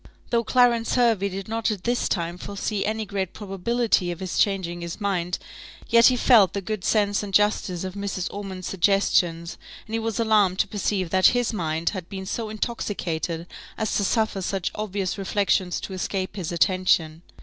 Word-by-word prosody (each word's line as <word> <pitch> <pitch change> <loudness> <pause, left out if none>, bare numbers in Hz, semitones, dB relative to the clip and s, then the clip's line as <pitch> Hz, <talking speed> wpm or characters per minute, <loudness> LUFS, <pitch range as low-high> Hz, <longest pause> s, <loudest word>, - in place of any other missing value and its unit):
Though 235 -1 +2
Clarence 240 -1 +3
Hervey 225 -5 +3
did 195 0 -6
not 225 +1 -1
at 205 -4 -3
this 240 0 0
time 175 -1 -2
foresee 200 +1 -3
any 220 0 -2
great 195 -3 -3
probability 205 0 0
of 175 - -4
his 185 -2 -3
changing 185 -4 0
his 170 +3 -6
mind, 180 -4 -1 0.5
yet 230 0 +7
he 255 - +4
felt 230 -6 +5
the 200 - -1
good 210 0 -4
sense 205 -2 +2
and 205 -1 -6
justice 195 -3 +1
of 185 -1 -4
Mrs. 200 -2 -3
Ormond's 190 -3 -6
suggestions; 175 -2 +1 0.3
and 220 - -10
he 225 - +1
was 225 -1 -2
alarmed 210 -5 +3
to - - +2
perceive 195 -4 -2
that 185 0 +6
his 245 -1 0
mind 165 -3 -1
had 185 -4 -6
been 190 -1 -6
so 220 +3 -3
intoxicated 180 -7 -3 0.3
as 220 - -1
to 205 - +1
suffer 220 -1 0
such 190 0 -2
obvious 200 -2 -3
reflections 195 -2 +1
to 195 - -6
escape 185 +1 -3
his 180 -5 -4
attention. 170 -3 +2
195 Hz, 180 wpm, -24 LUFS, 180-215 Hz, 0.5 s, yet